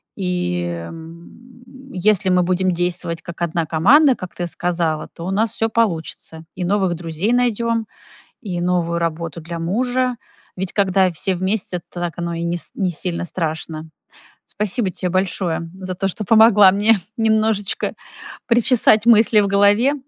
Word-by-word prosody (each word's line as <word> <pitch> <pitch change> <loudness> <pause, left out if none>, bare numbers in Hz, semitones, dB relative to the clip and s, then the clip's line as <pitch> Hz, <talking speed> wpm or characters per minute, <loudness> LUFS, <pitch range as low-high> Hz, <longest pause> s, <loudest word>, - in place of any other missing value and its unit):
И, 180 - -2
м, 235 - -11
если 190 0 +2
мы 180 -1 +3
будем 185 +1 +1
действовать 175 -1 -2
как 170 0 -10
одна 170 -1 -1
команда, 250 - +4
как 185 -5 -9
ты 175 - -3
сказала, 170 -3 -2
то 170 - -8
у 190 - -3
нас 215 +2 +1
всё 225 - 0
получится: 165 -6 -2
и 180 - -4
новых 190 -1 +1
друзей 170 +7 -2
найдём, 230 -2 0 0.6
и 180 -5 -4
новую 175 -1 0
работу 165 0 -3
для 170 +1 -7
мужа. 245 +7 0 0.4
Ведь 190 0 -3
когда 190 -2 +2
все 185 +3 -1
вместе, 185 -1 -2
то 175 - -7
так 175 -2 -3
оно 170 0 -3
и 165 - -4
не 170 +1 -1
с - - -5
не 190 -3 -1
сильно 175 +1 -4
страшно. 160 -2 -4 0.6
Спасибо 210 0 -1
тебе 180 0 -4
большое 175 -3 -2
за 185 -1 -5
то, 195 +2 -1
что 210 +3 -4
помогла 210 -2 +6
мне 210 +2 +3 0.2
немножечко 220 -2 0 0.5
причесать 235 -2 +4
мысли 225 -1 +5
в 200 - 0
голове. 205 +7 +3
185 Hz, 155 wpm, -19 LUFS, 170-220 Hz, 0.6 s, помогла